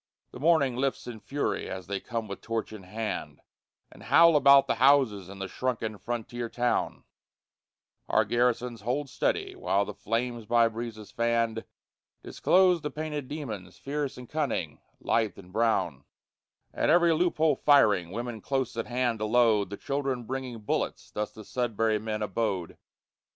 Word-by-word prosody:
The - - -10
morning 145 -4 +3
lifts 135 +1 -1
in 120 -3 -7
fury 135 +8 -2
as 95 -1 -6
they 100 -1 -3
come 115 -1 -4
with 100 - -7
torch 115 -1 -3
in 105 - -8
hand, 105 +4 -5 0.5
And - - -15
howl 170 -1 +6
about 140 -1 +7
the - - -1
houses 130 -9 +4
in 100 - -9
the 95 0 -4
shrunken 110 -3 -3
frontier 120 0 -4
town; 120 +1 -1 1.1
Our - - +3
garrisons 120 -1 0
hold 130 +6 -2
steady - - -1
while 100 +1 +1
the 105 - -6
flames 115 +1 -3
by 120 0 +4
breezes 110 -2 -7
fanned 115 -1 0 0.6
Disclose 180 -2 +3
the 150 - -3
painted 150 -3 -4
demons, 110 - -6
fierce 145 0 -3
and 125 -1 -9
cunning, 135 - -2 0.2
lithe 110 -3 0
and 90 -2 -14
brown; 90 - 0 0.7
At - - 0
every 170 +1 +5
loophole 160 -2 +2
firing, 110 - +4
women 115 +2 -5
close 135 -4 -2
at 115 - -2
hand 120 -2 0
to 110 - -1
load, 110 -3 +3
The 100 - -6
children 135 -1 -2
bringing 125 -1 -5
bullets, 105 - -2
thus 105 0 -3
the 110 - -11
Sudbury 115 -3 0
men 110 0 -3
abode. 95 -4 -2
115 Hz, 155 wpm, -28 LUFS, 110-135 Hz, 1.1 s, about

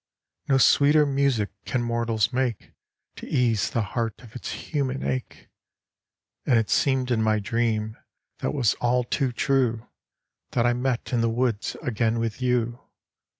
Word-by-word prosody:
No 135 - +5
sweeter 145 +3 +5
music 135 -7 +1
can 125 -2 -1
mortals 115 -1 0
make 125 -4 -2 0.5
To - - -8
ease 115 -8 +1
the 115 +4 0
heart 115 -3 -2
of 115 0 -15
its 125 - -5
human 135 -3 -3
ache! 130 -1 -4 1.0
And 125 - +3
it 115 -2 0
seemed 130 -2 +2
in 115 -2 +2
my 110 -1 +2
dream, 110 0 -1 0.4
that - - -1
was 130 -7 +2
all 125 +1 +2
too 130 +2 -1
true, 125 -3 0 0.7
That 120 - +2
I 120 - +3
met 125 0 -2
in 120 - +2
the 115 - +2
woods 115 -2 -1
again 115 -3 0
with 115 +1 -3
you. 120 -1 0
120 Hz, 150 wpm, -25 LUFS, 115-130 Hz, 1.0 s, No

